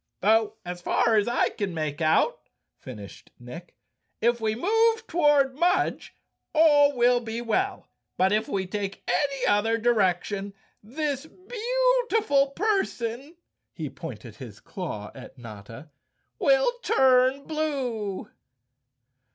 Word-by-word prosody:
" - - -55
Though 220 +2 +3
as 175 0 -6
far 230 +5 +2
as 210 0 +2
I 240 - +1
can 200 -5 -4
make 155 -1 -3
out," 165 - +1 0.3
finished 105 -7 -11
Nick, 145 +9 -11 0.2
" - - -51
if 240 -1 -2
we 220 -1 0
move 450 - +2
toward 295 -6 +3
Mudge 350 +6 0 0.4
all 290 -3 +5
will 245 0 +4
be 230 -1 -5
well, 375 - -2 0.3
but 190 +1 +3
if 215 +1 +1
we 190 -1 -1
take 195 +1 -5
any 275 +2 0
other 220 +2 +2
direction 200 -3 0 0.3
this 280 +5 -4
beautiful 470 - +1
person," 280 - -2 0.4
he - - -5
pointed - - -9
his - - -10
claw 165 - -7
at - - -12
Notta, 115 +5 -11 0.5
"will - - +3
turn 260 +1 +3
blue." 260 -11 -3
240 Hz, 125 wpm, -26 LUFS, 200-310 Hz, 0.5 s, all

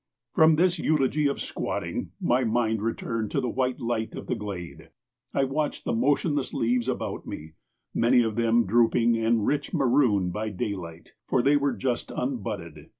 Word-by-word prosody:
From 160 0 +6
this 175 +1 +2
eulogy 150 -1 +2
of 140 - -2
squatting, - - -3
my 125 +2 +2
mind 110 -2 +1
returned 115 -1 -2
to - - 0
the 125 -3 -1
white 130 -1 -1
light 115 -2 -2
of - - -7
the - - -1
glade. 95 -5 -7 0.4
I 140 - +1
watched 145 +3 -2
the - - 0
motionless 145 +3 +1
leaves 120 +1 +1
about 130 - -3
me, 80 +1 -7 0.4
many 120 +1 +4
of 110 -2 -2
them 115 0 +3
drooping 115 +2 +3
and 115 -1 +1
rich 145 +4 -1
maroon 120 - +3
by 110 +3 -3
daylight, 90 -4 -5
for 125 - +2
they 140 +2 +4
were 140 -2 +2
just 120 +3 -2
unbudded. 115 -9 -4
120 Hz, 165 wpm, -26 LUFS, 110-135 Hz, 0.4 s, From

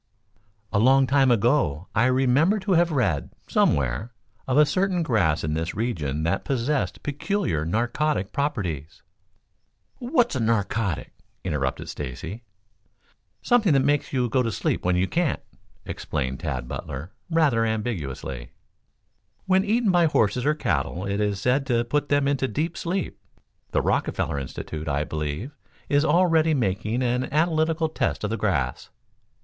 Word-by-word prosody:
"A 100 - +3
long 135 +4 +5
time 135 0 +3
ago 115 - +2
I 115 - +3
remember 135 +9 +3
to 195 +1 -2
have 175 -1 +4
read, 100 - 0 0.2
somewhere, 70 - +1 0.3
of 130 +1 +1
a 150 - +7
certain 185 +2 0
grass 90 - +1
in 75 - -1
this 80 +2 -2
region 80 - -2
that 85 - 0
possessed 135 +1 -1
peculiar 145 - -1
narcotic 120 - 0
properties 95 - -3 0.5
" - - -44
"What's 245 - +1
narcotic?" 110 -4 -1 0.3
interrupted 75 -7 -2
Stacy. 75 - -6 1.0
"Something 220 -9 +3
that 135 -1 +3
makes 145 0 +1
you 125 -2 +1
go 130 +2 +1
to 115 -2 -1
sleep - - -1
when 90 0 +2
you 90 +1 +2
can't," 170 - 0 0.5
explained 65 -3 -3
Tad 60 -1 -3
Butler, 70 +9 -6 0.2
rather 150 -9 +3
ambiguously. 85 - -3 1.0
"When 190 0 +3
eaten 215 0 +2
by 175 -2 +4
horses 125 -2 +1
or 150 - +3
cattle 85 - -1
it 100 +1 -1
is 100 -2 0
said 125 +6 +2
to 120 -3 +2
put 145 +5 -1
them 145 -1 +2
into 140 -2 +1
deep 155 +9 -2
sleep. 180 +2 -3 0.5
The - - 0
Rockefeller 70 - 0
Institute, 75 +4 -6
I 70 0 0
believe, 75 - -4 0.4
is 145 +1 +3
already 165 -2 +3
making 110 +1 -1
an 125 +1 0
analytical 160 +1 +2
test 155 - -2
of 105 - -1
the 115 - -1
grass." 70 - -1
120 Hz, 145 wpm, -25 LUFS, -, 1.0 s, a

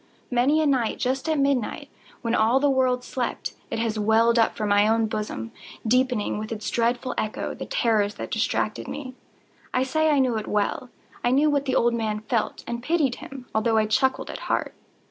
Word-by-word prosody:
Many 275 +6 +3
a - - +1
night, 260 -6 +1
just 265 +4 -1
at 315 - +2
midnight, 275 -5 0 0.4
when 230 0 0
all 235 +3 +4
the 285 0 +3
world 255 -2 +2
slept, 250 0 -3 0.2
it - - -3
has 225 -1 -1
welled 225 +2 +4
up 225 - +3
from 210 -1 -2
my 205 +1 +4
own 225 0 +3
bosom, 210 - -4 0.3
deepening, 250 -3 +1
with 215 +1 -6
its 215 -1 -4
dreadful 240 +2 0
echo, 215 - -3
the - - -7
terrors 220 - +1
that - - -6
distracted - - -1
me. 260 -3 -6 0.6
I 255 - +3
say 315 +4 +1
I 295 - +3
knew 255 -4 +2
it 215 - -4
well. 210 +5 -1 0.3
I 240 - +3
knew 290 +4 +3
what 285 -1 +1
the 265 - 0
old 240 0 +3
man 215 -2 -2
felt, 220 0 -2
and 235 0 -4
pitied 285 -2 +1
him, 270 -2 -9
although 220 +1 +2
I 215 - +3
chuckled 265 +5 +1
at - - -7
heart. - - 0
240 Hz, 200 wpm, -25 LUFS, 220-265 Hz, 0.6 s, all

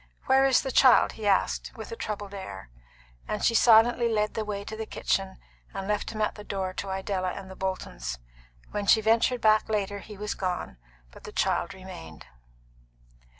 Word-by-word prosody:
"Where 265 +1 +5
is 265 - +3
the 265 - -3
child?" 255 0 +6
he 215 -2 -5
asked, 195 -2 +1
with - - -8
a - - -4
troubled 205 - -5
air; 95 - -8 0.6
and 210 - -3
she 230 - +4
silently 235 +1 +5
led 210 -1 0
the 220 - -2
way 205 -1 -4
to 220 - -7
the 220 0 -5
kitchen, 195 -1 -1 0.4
and 195 0 -4
left 210 0 -1
him 215 -1 -5
at - - 0
the 210 - -10
door 190 -2 -3
to 195 - -5
Idella 190 -1 -2
and 190 -1 -8
the - - -9
Boltons. 60 - -4 0.5
When 205 -1 -3
she 220 - +7
ventured 225 +3 +2
back 215 0 +4
later 205 -1 -1
he 210 +1 -11
was 210 +1 -3
gone, 180 - -3 0.3
but - - -15
the - - -8
child - - 0
remained. 185 - -10
205 Hz, 190 wpm, -27 LUFS, 190-220 Hz, 0.6 s, she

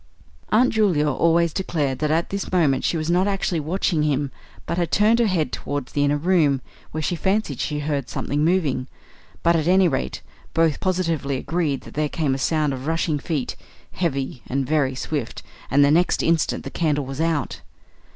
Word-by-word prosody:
Aunt 235 +4 +4
Julia 185 -9 +2
always 165 +3 +2
declared 150 -8 -1
that 150 - 0
at 165 +2 0
this 200 0 -3
moment 155 -8 +2
she 170 - +1
was 160 +1 -1
not 180 +3 +3
actually 195 -3 0
watching 165 +1 0
him, 145 -2 0 0.3
but 170 - -2
had 175 - -1
turned 215 +3 +4
her 235 - +3
head 165 -8 0
towards 145 -1 -4
the 145 - +1
inner 145 +1 +2
room, 155 -4 +2 0.3
where 155 0 -4
she 175 - 0
fancied 190 - -1
she 150 -1 -2
heard 145 -3 -2
something 145 +3 -1
moving; 155 -7 +1 0.6
but, 170 0 +4
at 160 -1 0
any 185 +1 +5
rate, 65 - -2 0.3
both 165 -2 +2
positively 165 -7 -1
agreed 155 -2 -1
that - - -12
there 150 0 0
came 150 -4 0
a 135 - -3
sound 150 0 +1
of 130 +2 -6
rushing 160 -2 0
feet, 150 -4 -3 0.4
heavy 135 -7 -2
and 135 +1 -1
very 140 -2 +1
swift 140 -3 -4 0.3
and 140 +1 +5
the 140 - +3
next 175 +3 +3
instant 165 -1 +1
the - - -6
candle 150 -4 0
was 135 +3 -4
out! 165 -4 -1
155 Hz, 190 wpm, -23 LUFS, 140-175 Hz, 0.6 s, any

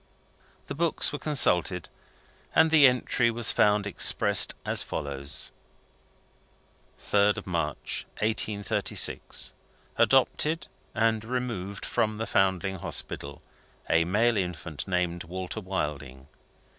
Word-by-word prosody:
The - - -6
books 165 0 +2
were 145 - -4
consulted, 90 - +2 0.7
and 160 0 +5
the 150 -4 +7
entry 125 -1 +1
was 115 -1 +3
found 105 -1 +2
expressed 105 - +3
as - - +1
follows: 70 -1 -3 1.5
"3d 105 +1 +1
March, 85 -5 -3
1836. 105 -1 -1 0.4
Adopted, 155 +1 +2 0.3
and 110 -1 +1
removed 115 -6 -4
from 110 -1 -1
the 110 - -3
Foundling 95 -2 0
Hospital, 70 -3 -2 0.4
a 85 0 +3
male 110 +6 +1
infant, 90 -5 -4
named 90 -2 -1
Walter 90 +2 -5
Wilding. 75 -8 -5
100 Hz, 100 wpm, -27 LUFS, 85-115 Hz, 1.5 s, the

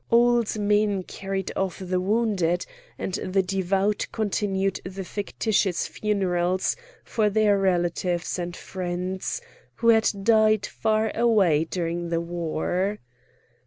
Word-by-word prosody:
Old 235 -1 +3
men 205 -2 +2
carried 195 0 -4
off 190 -2 -1
the 185 -1 -1
wounded, 190 -4 +1 0.3
and 190 - -4
the 190 +1 +1
devout 195 +2 0
continued 195 -3 -1
the 190 +1 -6
fictitious 200 -1 -1
funerals 185 -3 0 0.3
for 215 -2 +1
their 210 0 +3
relatives 175 -1 0
and 175 0 -4
friends 185 - -4 0.3
who 230 - +2
had 220 -1 +5
died 215 -1 +4
far 220 0 0
away 200 -10 +3
during 170 0 -3
the 165 0 +1
war. 175 +4 -2
195 Hz, 115 wpm, -25 LUFS, 180-210 Hz, 0.3 s, had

